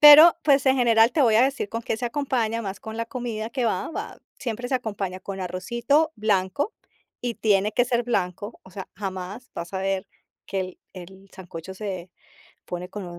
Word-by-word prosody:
Pero, 300 +3 +11
pues, 280 -3 +4
en 265 0 +5
general, 230 -2 +5
te 300 - +3
voy 230 -4 +5
a 230 - +7
decir 270 -5 +1
con 230 +2 -4
qué 225 - -1
se 245 - -4
acompaña, 240 -4 0
más 195 -2 -4
con 220 0 -7
la 230 0 -2
comida 235 -3 -4
que 250 0 -1
va 215 -5 0
va, - - -6 0.2
siempre 245 0 -3
se 265 - 0
acompaña 200 -6 -2
con 195 0 -6
arrocito 235 - +1
blanco 210 - +1 0.5
y 245 -1 -1
tiene 210 -1 +3
que 245 +3 +3
ser 240 -1 +1
blanco, 200 -2 -2
o 190 - -16
sea, 190 0 -7
jamás 195 +4 -5
vas 170 +2 -6
a 190 - -1
ver 195 0 -1 0.4
que 195 - -1
el 185 -1 -5
el 190 +2 -11
sancocho 185 -1 -8
se 190 -3 -5 0.6
pone 180 0 -5
con 205 0 -6
215 Hz, 195 wpm, -25 LUFS, 190-245 Hz, 0.6 s, Pero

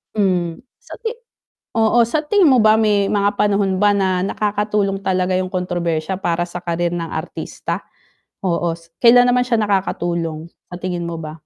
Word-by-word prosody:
Hmm, 180 -5 0 0.2
sa - - -11
ti 450 +1 -4 0.6
oo 225 +2 +3
sa 235 +7 0
tingin 410 +1 +3
mo 255 - +5
ba 215 0 +5
may 210 -2 +2
mga 205 0 0
panahon 200 -2 +1
ba 205 0 +4
na 190 -2 +1
nakakatulong 205 -1 -1
talaga 185 -1 0
yung 185 - -2
kontrobersiya 175 -1 -2
para 175 -3 0
sa 175 0 -6
career 170 0 -2
ng 170 -1 -3
artista? 160 +1 -5 0.6
Oo, 170 -2 0
s 165 0 -21
kailan 245 +1 +7
naman 250 0 +3
siya 240 - +2
nakakatulong? 170 -5 -1 0.2
Sa - - -5
tingin 175 -2 -3
mo 170 - -4
ba? 155 -1 -7
190 Hz, 170 wpm, -19 LUFS, 170-210 Hz, 0.6 s, kailan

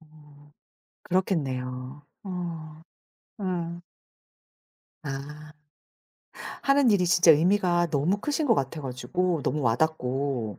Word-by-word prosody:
어. 150 -2 -19 0.5
그렇겠네요. 135 -7 -2 0.2
어. 165 -4 -6 0.6
예. 175 -2 -3 1.2
아. 150 +2 -7 1.1
하는 275 -3 +4
일이 185 -4 +3
진짜 175 -1 +6
의미가 175 +1 +3
너무 155 +8 +1
크신 295 +6 -1
것 230 - +5
같아 140 -1 -2
가지고 160 +6 -2
너무 150 +1 -1
와닿고 125 - -1
155 Hz, 185 characters per minute, -26 LUFS, 140-180 Hz, 1.2 s, 진짜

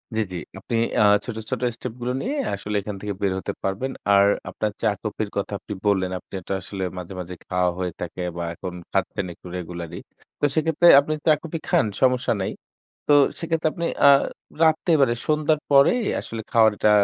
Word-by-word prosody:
জ্বি, 110 - +2
জ্বি। 90 - -4 0.2
আপনি 115 - -4 0.3
আ - - +6 0.2
ছোট, 120 - -5 0.2
ছোট - - -2
স্টেপ 120 -1 -6
গুলো 125 +1 -1
নিয়ে 275 +5 -2 0.2
আসলে 105 +1 -4
এখান 105 +1 -5
থেকে 105 -1 -3
বের 100 -2 +1
হতে - - -4
পারবেন। 100 +8 -2 0.2
আর 100 0 +6 0.2
আপনার 110 - -2
চা-কফির 105 0 -1
কথা 100 - -2
আপনি - - -7
বললেন 95 -3 +2
আপনি - - -26
এটা 90 - -4
আসলে 95 0 -5
মাঝে, 90 +1 -7
মাঝে 90 0 -6
খাওয়া 90 -1 +1
হয়ে 90 -2 -2
থাকে 90 +1 -4
বা 85 - -2
এখন 90 +1 -7 0.2
খাচ্ছেন 100 - -1
একটু 85 - -14
রেগুলারলি। 85 -1 -6 0.4
তো - - -18
সেক্ষেত্রে 160 +2 +3
আপনি 150 +2 -1
চা 155 - +6
কফি 165 0 -5
খান, - - +3 0.2
সমস্যা 125 -2 +3
নাই। 95 - -2 0.6
তো 145 - +6 0.3
সেক্ষেত্রে 165 -1 0
আপনি 170 -1 -3 0.2
আ - - +10 0.5
রাত্রে 160 +2 +3
মানে 120 -3 +3
সন্ধ্যার 155 0 +2
পরেই 140 - +5 0.2
আসলে 115 - -6
খাওয়ারটা 110 -2 +4
105 Hz, 185 wpm, -23 LUFS, 95-145 Hz, 0.6 s, আ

